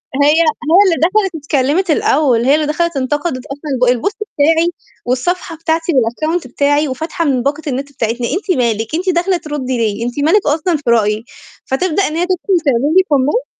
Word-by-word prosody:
هي 285 +1 +4
هي 335 +2 +4 0.4
اللي 345 -3 +3
دخلت 375 +1 +1
اتكلّمت 295 +4 0
الأول، 265 -6 +2
هي 275 - +5
اللي 305 0 0
دخلت 335 +1 -1
انتقدت 270 0 -2
أصلًا 275 -3 -1
الب 245 -2 -1
الpost 405 - 0 0.2
بتاعي 325 +4 +3 0.3
والصفحة 330 +8 -2
بتاعتي 325 +1 -1
والaccount 280 +5 0
بتاعي، 290 +4 +1
وفاتحة 320 +6 -3
من 260 -4 +1
باقة 290 +2 -1
النت 275 +1 -3
بتاعتنا. 235 -2 -2
أنتِ 370 - -1
مالِك 225 +2 -1
أنتِ 370 +2 -1
داخلة 355 +1 +1
ترُدّي 290 -5 -4
لي، 225 -1 -1
أنتِ 245 +4 -4
مالِك 390 +6 +3
أصلًا 320 +4 +1
في 295 - -15
رأيي؟ 215 -1 +1 0.4
فتبدأ 350 +7 0
إن 305 - -5
هي 345 - 0
تدخل 370 0 0
تعمل 245 -4 +2
لي 375 - +6
comment، 290 - +1
295 Hz, 180 wpm, -15 LUFS, 255-340 Hz, 0.4 s, لي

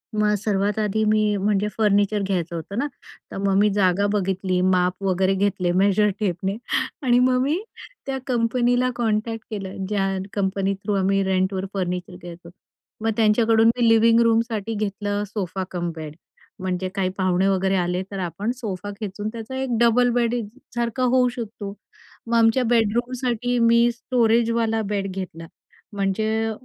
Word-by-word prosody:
मग 210 0 +2
सर्वात 205 0 0
आधी 215 +1 0
मी, 215 -1 +2
म्हणजे 205 +1 +1
फर्निचर 205 -1 +2
घ्यायचं 175 -3 -2
होतं 170 +6 -6
ना, 285 +4 0 0.4
तर - - -6
मग 195 0 +1
मी 210 - +4
जागा 195 0 +2
बघितली 190 -2 0
माप 185 0 +1
वगैरे 190 0 +2
घेतले 190 -2 0
मेजर 200 +2 +3
टेपने 190 -1 -1 0.5
आणि 245 -1 +4
मग 255 0 +3
मी 305 +6 0 0.5
त्या 270 -1 -2
कंपनीला 245 +1 +1
कॉन्टॅक्ट 225 -1 -1
केलं 195 -2 -5
ज्या 200 -2 +1 0.3
कंपनी 195 0 0
थ्रू 200 +2 -4
आम्ही 195 +1 +2
रेंटवर 190 0 0
फर्निचर 180 0 -3
घ्यायचो. 170 0 -11 0.5
मग 225 - 0
त्यांच्याकडून 225 0 +4
मी 235 -1 +3
लिविंग 225 0 +5
रूमसाठी 225 -1 +1
घेतलं 205 -1 -2
सोफा 190 -2 -4
कम 175 -1 -2
बेड, 155 -1 -7 0.4
म्हणजे 185 0 -2
काही 190 -2 0
पाहुणे 185 0 +2
वगैरे 190 0 +1
आले 180 +1 0
तर 195 - -4
आपण 195 +5 -2
सोफा 205 -5 -5
खेचून 205 0 -5
त्याचा 230 +2 -7
एक 245 -4 -1
डबल 240 +1 +4
बेड 240 0 +1 0.4
सारखा 240 +1 -1
होऊ 250 0 +4
शकतो. 220 -4 -6 0.5
मग 235 - 0
आमच्या 225 +3 +4
बेडरूमसाठी 240 +1 0
मी 235 +1 +5
स्टोरेजवाला 230 -2 +1
बेड 200 -2 -2
घेतला, 170 -3 -6 0.5
म्हणजे 220 +3 0
210 Hz, 150 wpm, -23 LUFS, 190-230 Hz, 0.5 s, लिविंग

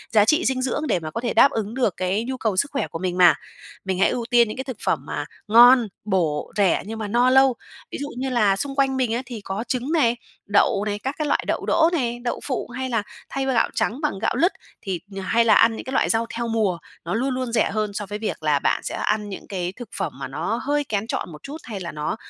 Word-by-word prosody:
giá 210 -1 +6
trị 305 +9 +3
dinh 260 -1 +1
dưỡng 280 +4 -1
để 180 - +1
mà 155 -2 -6
có 230 - -4
thể 240 - -1
đáp 275 +5 +6
ứng 220 -3 -3
được 245 -7 +1
cái 185 +4 0
nhu 260 +2 -4
cầu 220 -6 -1
sức 280 +8 +1
khỏe 280 - -1
của 165 - -6
mình 180 0 -2
mà. 175 -3 +7 0.5
Mình 190 -1 -1
hãy 195 - +4
ưu 240 -2 -2
tiên 240 -2 +5
những 215 - -6
cái 265 - -3
thực 260 -5 -6
phẩm - - +2
mà - - -4 0.2
ngon, 240 +2 +7 0.2
bổ, 170 -7 0
rẻ, 195 -4 +3
nhưng 220 +2 -6
mà 215 - -3
no 240 +4 +3
lâu. 265 -1 +5 0.4
Ví - - -4
dụ 285 - -3
như 265 +1 -2
là 215 -6 +3
xung 275 +7 -4
quanh 270 -1 +2
mình 250 -3 +1
á 240 - -1
thì 240 -4 -7
có 195 +2 -4
trứng 255 +4 -2
này, 275 -8 +3 0.3
đậu 205 0 +3
này, 205 -1 -2
các 265 +6 -3
cái 305 - -1
loại - - +1
đậu - - -1
đỗ 325 0 +4
này, 240 -7 -1
đậu 240 - -2
phụ, 255 -4 -3
hay 260 +2 -4
là 230 -4 0 0.3
thay 275 -1 -2
gạo 260 -3 +2
trắng 250 +7 -1
bằng 300 -11 -1
gạo - - 0
lứt 350 +3 +3 0.3
thì, 190 -3 -3
nh 195 -1 -8
hay 230 +5 +2
là 220 - +6
ăn 230 0 +5
những - - -7
cái 260 - -5
loại - - +2
rau 225 +1 +2
theo 235 0 -2
mùa, 215 -6 +1 0.3
nó 170 - -2
luôn 245 +5 0
luôn 255 -2 -3
rẻ 230 - +2
hơn 210 0 -2
so 205 0 -4
với 205 +2 -6
việc 215 -7 -4
là 150 -2 +3
bạn - - +1
sẽ - - -4
ăn 210 -1 -1
những 195 - -8
cái 180 -2 -3
thực 245 -2 -9
phẩm 150 - -2
mà 135 - -4
nó 155 +11 -2
hơi 290 +1 +1
kén 215 -4 -2
chọn 175 - -3
một 150 - -12
chút, 285 +3 -7
hay 215 -5 -6
là 170 -2 -5
nó, 150 0 -3
230 Hz, 275 wpm, -23 LUFS, 195-260 Hz, 0.5 s, mà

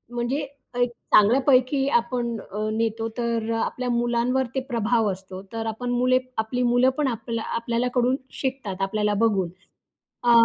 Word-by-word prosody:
म्हणजे 240 +4 0 0.4
एक 245 - +3 0.3
चांगल्यापैकी 260 +4 +4
आपण 235 -1 -3
अ, 215 +2 -4
नेतो 225 0 -1
तर 230 -1 -1
अ, 225 - 0
आपल्या 250 0 -3
मुलांवर 240 +2 +1
ते - - +2
प्रभाव 230 -2 +2
असतो. 190 0 -8
तर 225 0 -3
आपण 225 +3 -3
मुले 250 +1 +3 0.3
आपली 250 +3 -1
मुलं 250 +1 +5
पण 300 -2 +1
आपल्या 230 -1 -3
आपल्याला 235 +1 0
कडून 250 +1 +3 0.3
शिकतात 255 -8 -3
आपल्याला 210 +1 0
बघून. 195 -6 +1 0.7
अ 240 - +4
235 Hz, 150 wpm, -24 LUFS, 220-250 Hz, 0.7 s, मुलं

